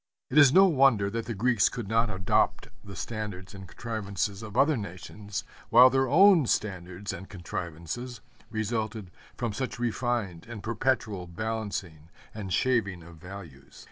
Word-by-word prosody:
It 150 - +5
is 145 -3 +8
no 190 +5 +7
wonder 135 - +4
that 115 +1 -4
the 115 - -3
Greeks 115 0 +3
could 120 -5 -6
not 115 +2 +2
adopt 95 -2 +1
the 100 -1 -10
standards 100 0 -5
and 95 -1 -10
contrivances 100 -2 -3
of 110 0 -7
other 145 +3 +4
nations, 105 0 -6 0.3
while 125 +3 +8
their 135 0 +2
own 175 -1 +6
standards 95 -1 -2
and 95 +1 -9
contrivances 90 +6 -6 0.3
resulted 110 -2 -3 0.3
from 120 -3 -2
such 130 +4 -4
refined 120 -6 -2
and 110 -4 -8
perpetual 110 -5 -1
balancing 95 -5 -4 0.2
and 100 -3 -6
shaving 105 -8 +1
of 85 0 -13
values. 80 -6 -11
105 Hz, 145 wpm, -28 LUFS, 95-120 Hz, 0.3 s, is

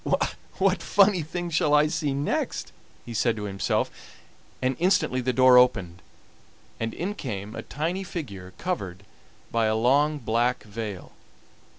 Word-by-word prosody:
"What 190 -2 +2
funny 195 -1 +4
thing 175 +3 -4
shall 150 -2 +3
I 150 0 +5
see 155 -2 -1
next?" 140 +2 -2 0.3
he 120 - -7
said 115 +1 +1
to 105 - -6
himself, 100 -1 -1 0.7
and 130 0 0
instantly 180 -8 +2
the 130 +1 0
door 130 0 +7
opened, 95 -8 +1 0.8
and 115 0 -2
in 190 +4 -2
came 105 - -6
a - - -4
tiny 170 +6 -3
figure 100 - -7
covered 105 - -4 0.5
by 115 -1 +2
a 110 - +1
long 140 +7 +3
black 120 0 0
veil. 105 -3 -6
130 Hz, 145 wpm, -26 LUFS, 110-160 Hz, 0.8 s, door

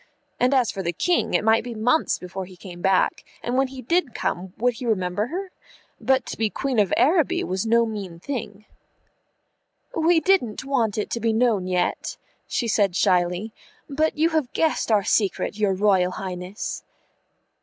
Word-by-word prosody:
And 250 +1 +3
as 255 -4 +3
for 195 - -5
the 170 -1 -2
King, 350 - +1
it - - +2
might 220 +1 +4
be 240 -1 -6
months 245 +9 +2
before 185 +1 -6
he 185 0 -14
came 175 -1 -10
back, 190 0 +2 0.2
and 245 - -2
when 265 +1 +3
he 260 -1 -9
did 305 -1 0
come 180 +1 -2
would 245 +2 +2
he 245 +1 -6
remember 195 -1 0
her? 370 +6 -5 0.5
But 260 +3 +2
to - - -7
be 220 -1 +2
Queen 265 +1 -1
of 200 -3 +2
Araby 320 +1 +3
was 185 +5 -2
no 230 +1 +4
mean 200 -6 -6
thing. 215 -3 -6 1.3
"We 330 -1 +4
didn't 290 - +1
want 240 -7 0
it 210 - -2
to 235 - -1
be 225 0 +1
known 220 -5 +2
yet," 180 -1 -1 0.3
she 235 - -1
said 200 -4 +2
shyly, 180 +4 +1 0.3
"but 310 +3 0
you 320 +2 +3
have 315 -6 -1
guessed 315 -7 +1
our 210 -2 +4
secret, 205 +1 0
your 200 -3 +2
Royal 185 -2 +2
Highness." 185 +1 -5
220 Hz, 175 wpm, -24 LUFS, 190-260 Hz, 1.3 s, might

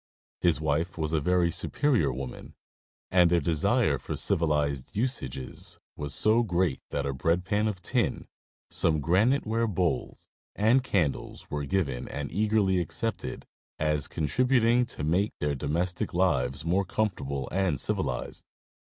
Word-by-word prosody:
His 85 -3 +2
wife 80 +4 -1
was 80 -1 -2
a 80 - +2
very 90 +1 +2
superior 145 - +1
woman, 65 0 -7 0.6
and 90 -2 +5
their 85 0 +3
desire 80 -1 +1
for - - -5
civilized 75 -4 0
usages 65 - -3 0.2
was 75 -2 -3
so 110 +2 +4
great 90 - 0
that 70 - -2
a 70 - -1
bread 85 +7 0
pan 105 +2 +1
of 95 -4 -4
tin, - - 0 0.5
some 80 -2 +2
granite 100 - +2
ware 115 +1 0
bowls, 90 -4 -2 0.3
and 115 +5 +3
candles, 90 - -2
were 75 -1 -2
given 70 -6 -1
and 70 0 -5
eagerly 105 -2 +2
accepted 115 +4 -3 0.3
as 75 -2 0
contributing 120 - +2
to 75 - -5
make 90 +8 +1
their 75 0 -1
domestic 85 +7 -2
lives 75 -5 +1
more 90 +4 +2
comfortable 80 - -2
and 95 -7 +1
civilized. - - -2
85 Hz, 140 wpm, -28 LUFS, 75-105 Hz, 0.6 s, and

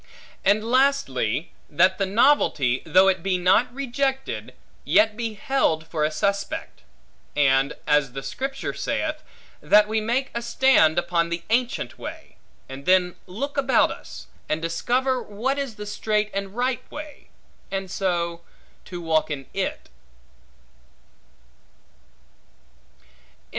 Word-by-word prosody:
And 205 +2 +3
lastly, 225 - +1 0.2
that 185 +2 +3
the 195 - +1
novelty, 190 - +3
though 185 +4 +5
it 190 -2 +2
be 185 +1 0
not 185 +7 +3
rejected, 270 +1 -3 0.3
yet 315 -9 +3
be 225 -1 -4
held 195 -9 0
for 160 -1 -2
a 150 - +2
suspect; 200 - -2 0.5
and, 135 -1 +3
as 150 -4 +2
the 135 0 -6
Scripture 270 - -4
saith, 305 +2 -2 0.4
that 210 0 +5
we 220 0 0
make 245 +5 -1
a 235 - -2
stand 235 -9 +4
upon 170 -1 +1
the 170 0 -3
ancient 245 +1 0
way, - - -9 0.3
and 135 +1 -9
then 180 -1 +3
look 275 +11 -5
about 265 -1 +3
us, - - -10 0.2
and 155 - 0
discover 245 +11 0
what 245 +8 -2
is 270 -6 -4
the 210 0 -7
straight 210 0 -1
and 195 0 -4
right 250 +1 0
way, 300 0 -9 0.4
and 195 -1 -4
so 170 -3 -1 0.4
to 175 - -7
walk 160 -1 +1
in 140 -3 -4
it. - - -3
200 Hz, 125 wpm, -24 LUFS, 170-255 Hz, 0.5 s, though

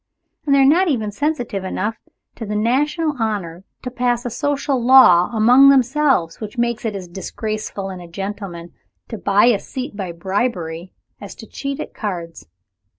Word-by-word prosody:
And 280 - +4
they - - +4
are 270 - +5
not 345 +7 +4
even 220 -9 -1
sensitive 245 -6 -2
enough 210 +3 -3 0.4
to - - -8
the 210 -1 -4
national 295 +8 0
honor 195 -6 -3 0.2
to 250 - -5
pass 245 0 -1
a 245 - -3
social 280 -1 -1
law 240 -9 +7
among 245 +5 +6
themselves 265 - +2
which 215 +3 -7
makes 235 -1 -1
it 215 -2 -2
as 185 -2 -6
disgraceful 200 +2 -5
in 185 -1 -8
a 175 - -11
gentleman 190 -2 -7 0.4
to 225 - -6
buy 200 +2 +3
a 235 -4 +4
seat 255 -1 -7
by 190 -4 -4
bribery 175 -2 -3 0.3
as - - -10
to - - -11
cheat 275 +1 -5
at - - -6
cards. 170 - -6
220 Hz, 170 wpm, -19 LUFS, 190-265 Hz, 0.4 s, law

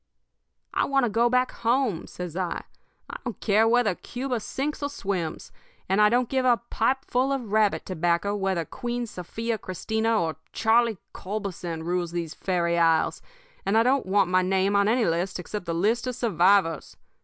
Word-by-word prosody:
I - - +2
want 275 -1 +2
to 230 - -2
go 235 +3 +3
back 250 +1 +2
home,' 235 -6 0
says 180 -2 -7
I. 180 -2 -2 0.4
'I - - -6
don't 240 -6 -5
care 215 +1 +3
whether 235 -3 +3
Cuba 250 +5 -4
sinks 280 +8 -4
or 285 - -1
swims, 190 - -4 0.4
and 195 +3 +2
I 210 - +6
don't 245 +2 +2
give 260 +1 0
a 245 -2 +4
pipeful 265 0 +1
of 250 -7 -3
rabbit 215 -1 +2
tobacco 175 +3 0
whether 190 -4 -1
Queen 240 +7 -4
Sophia 225 +3 -4
Christina 220 +5 -1
or 160 -3 -2 0.2
Charlie 225 -1 +3 0.2
Culberson 185 -5 -5
rules 175 0 -2
these 170 -2 -3
fairy 170 -2 0
isles; 165 -1 +2 0.4
and 200 +3 +1
I 225 - +5
don't 260 -2 +2
want 195 -1 +3
my 185 0 +4
name 190 +2 +1
on 200 0 +4
any 230 +1 +2
list 175 +3 -1
except 180 +2 -6
the 165 - -1
list 220 +8 +1
of 250 - -2
survivors. 195 -6 +2
205 Hz, 175 wpm, -26 LUFS, 180-240 Hz, 0.4 s, I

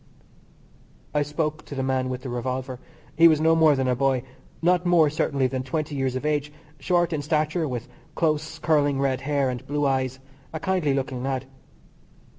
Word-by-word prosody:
I 150 - +2
spoke 150 +1 -2
to 145 - -8
the 135 - -2
man 130 -1 0
with 125 0 -5
the 130 - -5
revolver. 130 +1 -3 0.4
He 165 +1 +8
was 155 -2 +4
no 160 +1 +4
more 160 -2 +5
than 130 -1 0
a 125 - +2
boy, 130 -1 +1 0.4
not 175 +1 +2
more 170 -4 +4
certainly 140 -3 0
than 130 0 -1
twenty 150 +3 -3
years 135 -2 -1
of 130 - -3
age, 150 -1 0 0.3
short 175 +2 +1
in 150 - -1
stature, 155 +2 0
with 125 -1 -4 0.3
close 155 0 0
curling 145 -4 +2
red 135 -1 0
hair 140 -1 0
and 125 -1 -6
blue 145 0 0
eyes 130 -1 0 0.4
a 160 - -3
kindly 170 -6 0
looking 130 -2 -3
lad. 135 0 -2
145 Hz, 185 wpm, -25 LUFS, 130-155 Hz, 0.4 s, He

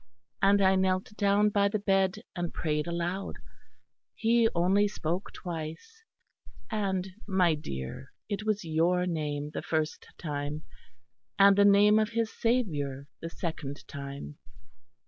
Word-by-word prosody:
And 200 0 +5
I 190 0 +5
knelt 190 +2 0
down 205 0 +3
by 200 -1 +3
the 205 - 0
bed 195 -2 +2 0.2
and 175 -2 -2
prayed 150 0 -1
aloud; 175 +3 -2 0.8
he 230 0 +3
only 190 +4 +3
spoke 180 -1 -3
twice; 165 - -7 0.7
and, 195 -4 -1 0.2
my 185 -4 +3
dear, 65 - -6 0.2
it 205 +1 -3
was 210 -3 -1
your 170 +3 +2
name 150 -4 -2
the - - -4
first 155 -1 -2
time, 145 -1 -4 0.7
and 200 0 +7
the 200 0 +5
name 205 +1 +6
of 215 0 +1
His 230 -1 -1
Saviour 150 - -1 0.2
the 165 - -4
second 155 -5 -5
time. 140 - -7
185 Hz, 130 wpm, -29 LUFS, 155-205 Hz, 0.8 s, and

